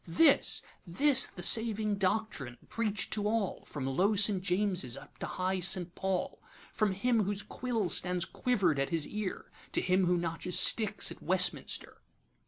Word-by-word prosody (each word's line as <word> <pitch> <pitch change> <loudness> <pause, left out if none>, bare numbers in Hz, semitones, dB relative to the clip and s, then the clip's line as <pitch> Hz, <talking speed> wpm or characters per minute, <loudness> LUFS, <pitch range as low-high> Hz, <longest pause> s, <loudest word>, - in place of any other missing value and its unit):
'This, 275 - +3 0.2
this 265 - +2
the 180 - -6
saving 220 0 +3
doctrine 190 - -2
preach'd 215 -4 -2
to 210 -1 -1
all, 215 -3 -2
From 140 -3 -6
low 185 +11 +1
St. 200 -1 +4
James's 185 - 0
up - - -15
to - - -4
high 185 +1 -2
St. 180 -1 0
Paul; 190 -1 -3 0.3
From 210 -3 0
him 230 +4 +1
whose 200 0 -2
quills 230 -7 +1
stand 180 0 -2
quiver'd 190 - +1
at 135 - 0
his 165 -3 0
ear, 210 -3 -6 0.2
To - - +1
him 185 +1 +1
who 180 0 +2
notches 170 +1 -2
sticks 215 -2 +2
at - - -10
Westminster. - - +2
190 Hz, 160 wpm, -31 LUFS, 180-215 Hz, 0.3 s, St